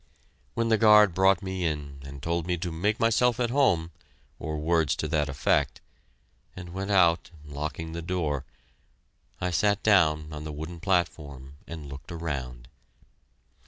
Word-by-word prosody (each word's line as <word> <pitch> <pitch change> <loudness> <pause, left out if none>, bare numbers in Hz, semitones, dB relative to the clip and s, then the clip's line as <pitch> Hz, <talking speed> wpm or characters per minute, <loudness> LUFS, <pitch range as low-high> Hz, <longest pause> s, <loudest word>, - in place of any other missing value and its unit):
When 115 0 0
the 110 -1 +3
guard 105 -3 +7
brought 95 0 +3
me 95 -1 -3
in 75 -4 -3
and 70 0 -10
told 85 0 -1
me 90 -1 0
to 85 0 -4
"make 100 +7 -1
myself 115 +1 +2
at 120 -1 0
home" 90 - +2 0.5
or 80 +1 -4
words 80 -1 +1
to - - -3
that 75 -3 0
effect, 70 +1 +1 0.8
and 90 -1 -9
went 95 +1 -4
out, 85 -4 +3 0.2
locking 75 +3 -5
the 85 +1 -5
door, 80 -6 -2 1.0
I 90 - -1
sat 100 +3 +1
down 80 -7 +3
on 75 0 -6
the 80 - -6
wooden 80 +3 -7
platform, 75 -7 -2
and 80 -3 -7
looked 70 +3 -10
around. 65 -8 -5
85 Hz, 155 wpm, -27 LUFS, 75-95 Hz, 1.0 s, guard